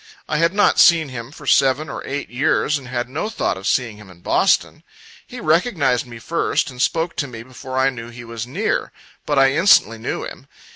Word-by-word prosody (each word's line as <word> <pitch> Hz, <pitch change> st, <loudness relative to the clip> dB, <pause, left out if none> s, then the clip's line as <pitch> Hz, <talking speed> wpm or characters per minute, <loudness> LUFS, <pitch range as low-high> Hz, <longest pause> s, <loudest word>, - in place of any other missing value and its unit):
I 150 Hz, -, -1 dB
had 165 Hz, 0 st, +3 dB
not 205 Hz, -, +3 dB
seen 165 Hz, -4 st, +5 dB
him 125 Hz, 0 st, -7 dB
for 150 Hz, 0 st, -13 dB
seven 135 Hz, +3 st, +3 dB
or -, -, -6 dB
eight 140 Hz, -1 st, -4 dB
years, 145 Hz, +3 st, +1 dB
and 130 Hz, -, -12 dB
had 120 Hz, -1 st, -3 dB
no 150 Hz, -, -4 dB
thought 220 Hz, -, -1 dB
of 95 Hz, +1 st, -6 dB
seeing 115 Hz, -5 st, 0 dB
him 105 Hz, -2 st, -14 dB
in 90 Hz, -2 st, -16 dB
Boston. -, -, +1 dB, 0.5 s
He 250 Hz, -, -9 dB
recognized 155 Hz, -, +1 dB
me 120 Hz, -1 st, -10 dB
first, 145 Hz, +3 st, -1 dB
and 125 Hz, -1 st, -7 dB
spoke 165 Hz, +3 st, 0 dB
to 145 Hz, -, -1 dB
me 115 Hz, -3 st, -9 dB
before 130 Hz, +1 st, -8 dB
I 135 Hz, +1 st, +3 dB
knew 120 Hz, -2 st, -9 dB
he 120 Hz, +1 st, -10 dB
was 115 Hz, 0 st, -6 dB
near; 190 Hz, -, -2 dB, 0.4 s
but 145 Hz, -, 0 dB
I 135 Hz, 0 st, +5 dB
instantly 145 Hz, -, +4 dB
knew -, -, -4 dB
him. -, -, -10 dB
135 Hz, 210 wpm, -20 LUFS, 120-155 Hz, 0.5 s, seen